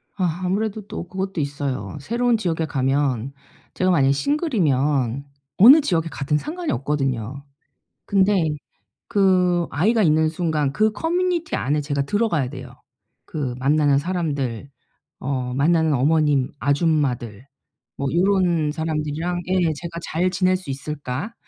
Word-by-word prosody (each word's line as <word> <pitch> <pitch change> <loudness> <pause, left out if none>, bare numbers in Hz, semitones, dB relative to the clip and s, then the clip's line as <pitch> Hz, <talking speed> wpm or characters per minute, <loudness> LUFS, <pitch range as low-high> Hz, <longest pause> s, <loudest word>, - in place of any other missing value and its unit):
아 180 -2 -1
아무래도 210 +3 -1
또 175 - -6
그것도 190 -2 -3
있어요. 140 0 -4
새로운 235 - +1
지역에 165 -6 -1
가면 135 -2 0 0.4
제가 185 0 +1
만약에 140 -6 +3
싱글이면 145 - 0 0.3
어느 265 +10 +9
지역에 165 - 0
가든 145 +1 -1
상관이 335 - -4
없거든요. 135 -2 -2 0.6
근데 195 -3 +2 0.6
그 180 -3 +2
아이가 215 +8 +2
있는 155 -1 +3
순간 155 -4 -1
그 215 +7 +2
커뮤니티 345 +5 -1
안에 150 +3 0
제가 145 -1 -1
들어가야 170 - 0
돼요. 130 -3 -9 0.6
'그 135 -6 -3
만나는 145 +1 +3
사람들 140 -7 -3 0.5
어 130 -2 -3
만나는 160 +3 +2
어머님, 145 -1 +2
아줌마들 140 - 0 0.5
뭐 140 - -2
요런 175 -4 +2
사람들이랑 160 +2 -2
예예 180 -3 +1
제가 170 +2 -7
잘 175 +3 0
지낼 185 0 +1
수 180 -5 -12
있을까?' 140 - -5
160 Hz, 295 characters per minute, -22 LUFS, 140-185 Hz, 0.6 s, 어느